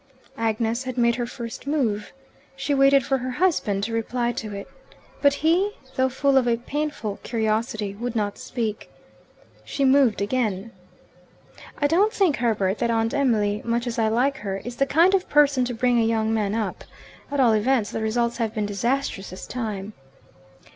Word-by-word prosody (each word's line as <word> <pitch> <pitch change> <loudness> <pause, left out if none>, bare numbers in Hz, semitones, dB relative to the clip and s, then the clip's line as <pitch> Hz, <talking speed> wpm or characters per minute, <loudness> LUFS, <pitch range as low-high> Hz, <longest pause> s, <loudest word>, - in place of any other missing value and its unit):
Agnes 225 +2 0
had 255 -1 -5
made 235 -1 +3
her 240 -1 -2
first 235 +2 -8
move. 240 -9 -1 0.4
She 275 +2 -1
waited 275 -1 +5
for 270 -1 +1
her 255 +1 -4
husband 245 - +1
to 225 - -2
reply 235 +1 -1
to 220 -3 -5
it. 200 0 -7 0.5
But 285 -1 +4
he, 370 +6 +3 0.2
though 260 0 +2
full 270 +1 +2
of 255 -2 +3
a 235 -1 +2
painful 265 -5 -4
curiosity, 220 -2 -1
would 235 +3 -5
not 205 -2 -1
speak. 225 -4 -4 0.7
She 275 - -1
moved 260 -6 +4
again. 210 -1 -1 1.1
"I 290 - 0
don't 365 +9 +3
think, 370 -9 +2
Herbert, 215 -4 0
that 235 - 0
Aunt 225 0 +1
Emily, 215 -7 +1
much 235 +1 -1
as 235 -1 -3
I 220 - +3
like 255 +5 +1
her, 195 -4 -4
is 245 0 -6
the 275 - +2
kind 335 +7 +4
of 385 -1 +1
person 285 -3 +4
to 245 - -3
bring 245 +1 +2
a - - +3
young 225 -1 +1
man 210 -2 0
up. 225 -2 -3 0.5
At 285 0 -2
all 240 -4 +5
events 220 0 +1
the 225 - -3
results 235 +2 0
have 225 -2 -2
been 215 -1 0
disastrous 205 0 -2
this 185 - -8
time." 215 -4 -5
235 Hz, 180 wpm, -24 LUFS, 220-270 Hz, 1.1 s, waited